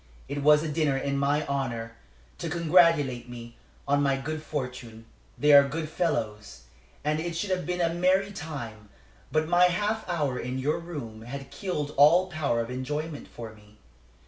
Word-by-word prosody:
It 140 +1 -4
was 150 +1 +5
a - - -2
dinner 150 -2 +1
in 140 +1 -2
my 145 +2 +1
honor, 120 -5 -3 0.5
to - - -3
congratulate 165 -8 +3
me 120 -1 -9 0.3
on 145 +1 +3
my 140 -1 +2
good 155 +3 -4
fortune. 125 -6 -6 0.3
They 150 0 +4
are 140 -1 +8
good 155 +2 -4
fellows, 105 - -2 0.4
and 150 +1 0
it 170 +1 -3
should 195 +3 -2
have 180 -1 -1
been 180 0 -1
a 165 -1 +1
merry 185 +3 +2
time. 120 - -7 0.4
But 155 0 +1
my 175 +1 +5
half 210 +4 0
hour 145 -7 -1
in 125 +2 -4
your 145 +5 0
room 145 -11 -7
had 135 +4 -8
killed 150 -7 -3
all 170 +6 +6
power 140 -7 0
of 115 +2 -5
enjoyment 150 +4 -4
for 115 -2 -9
me. 105 0 -20
145 Hz, 170 wpm, -27 LUFS, 125-165 Hz, 0.5 s, are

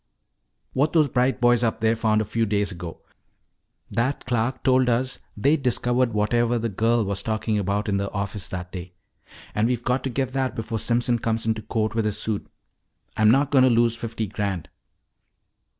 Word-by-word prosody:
"What 145 +4 +1
those 155 -3 +4
bright 125 0 +1
boys 120 -1 +4
up 115 -1 0
there 110 0 +2
found 110 -1 +2
a - - -2
few 115 +2 0
days 105 -1 0
ago. 85 -2 -8 0.9
That 130 +4 -1
clerk 120 0 -1
told 130 -1 +4
us 125 +2 0
that - - -31
they'd 140 +8 +2
discovered 125 -1 +1
whatever 120 +3 +1
the 115 0 -1
girl 115 +2 +1
was 100 0 -2
talking 110 0 -1
about 100 +2 -1
in 100 -1 +1
the 100 0 -2
office 100 0 -4
that 90 -1 -6
day. 90 -1 -8 0.6
And 105 +2 +2
we've 120 -1 -1
got 125 +1 0
to - - 0
get 130 0 -2
that 130 -3 -1
before 115 0 -3
Simpson 120 +1 +1
comes 110 0 -1
into 110 -1 0
court 110 0 -1
with 115 -1 0
his 105 -1 0
suit. 110 -2 -2 0.7
I'm 110 -1 +4
not 140 +4 +3
going 135 -2 +5
to 130 - +6
lose 115 -1 +3
fifty 115 -1 -4
grand." 100 -4 -3
115 Hz, 190 wpm, -24 LUFS, 105-125 Hz, 0.9 s, to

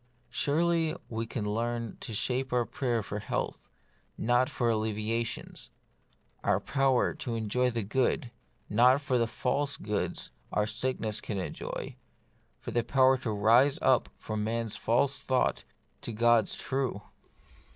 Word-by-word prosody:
Surely 165 +2 +1
we 115 0 -3
can 115 -2 -3
learn 115 +1 -2
to - - -7
shape 130 +4 -1
our 125 -1 +2
prayer 120 -6 -1
for 105 +1 -4
health, - - -4 0.5
not 120 +4 +2
for 125 -5 -1
alleviations; 110 +1 -2 0.7
for - - +2
power 135 -2 +2
to 120 - -4
enjoy 115 +3 +1
the 115 -2 -2
good, 120 +2 0 0.4
not 125 +5 +5
for 130 -3 0
the 115 - +2
false 140 +4 -1
goods 105 0 -2 0.2
our 105 - +1
sickness 110 -1 -1
can 105 - -4
enjoy; 95 - -5 0.6
for - - -6
power 130 +2 +4
to 130 -2 -4
rise 115 +7 +4
up 130 -2 +4
from 110 -1 -3
man's 115 0 -2
false 130 +5 +1
thought 130 -1 0 0.4
to - - -4
God's 115 0 +3
true. 130 -6 -2
120 Hz, 135 wpm, -30 LUFS, 110-130 Hz, 0.7 s, not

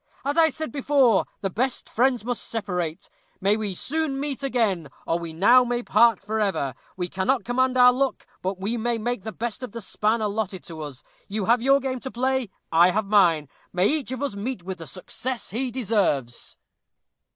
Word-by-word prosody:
"As 285 +1 0
I 325 -1 +5
said 315 -4 -5
before, 270 -6 +3
the 195 -2 -2
best 250 +6 -1
friends 245 -1 +1
must 245 -1 -1
separate. 180 -7 -3 0.3
We 200 +2 +3
may 210 -3 -3
soon 295 - -1
meet 285 -1 -3
again, 220 - 0 0.2
or 165 - 0
we 170 -1 -6
now 230 +10 +6
may 245 0 -2
part 235 -4 +4
forever. 200 -9 -1 0.2
We 180 -1 -2
cannot 190 +9 0
command 255 +1 +1
our 250 0 +8
luck; 270 +1 -1 0.2
but 190 0 -3
we 220 +5 -2
can 235 -1 -1
make 245 -2 -1
the 220 +3 -5
best 235 +2 -4
of 250 -5 -7
the 235 - -5
span 215 +2 0
allotted 205 -3 -2
to 160 -2 -8
us. 145 -4 -8 0.2
You 205 -1 -2
have 235 +2 +3
your 275 +2 +4
game 260 -1 -3
to 265 - -6
play. 260 -1 0 0.2
I 170 +2 +6
have 210 +3 0
mine. 175 -7 +4 0.2
May 180 +3 +2
each 295 -4 -1
of 260 +2 -3
us 275 -7 -2
meet 205 -1 -4
with 185 0 -6
the 165 - -7
success 235 +6 -4
he 250 +5 -1
deserves." 200 - -1
225 Hz, 195 wpm, -25 LUFS, 190-255 Hz, 0.3 s, our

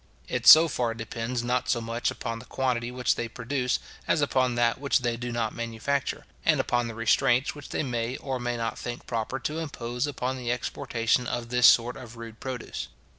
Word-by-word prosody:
It - - -2
so 160 +2 +11
far 120 -6 -1
depends 115 +2 -3
not 125 +1 0
so 120 - +2
much 115 +1 -1
upon 115 -1 -4
the 120 - -12
quantity 125 -2 -1
which 125 -1 +1
they 115 - -3
produce, 125 +2 -1 0.3
as - - +3
upon 130 -2 +2
that 120 0 +2
which 140 -1 +2
they 120 -1 0
do 120 +1 -5
not 115 -2 -1
manufacture; 115 +4 -2 0.2
and - - +3
upon 120 -1 +1
the 115 - -6
restraints 120 +3 +2
which 145 -2 -11
they - - -1
may 120 -1 -2
or 130 -2 -4
may 120 0 -2
not 115 -1 -3
think 120 0 -6
proper 115 +2 -2
to 155 +4 -2
impose 125 -4 -3
upon 130 -2 -2
the 120 -2 -2
exportation 120 0 0
of 120 -1 -3
this 125 0 +6
sort 120 0 +5
of 115 -1 -11
rude 115 -1 -9
produce. 130 -3 -5
120 Hz, 200 wpm, -27 LUFS, 115-125 Hz, 0.3 s, so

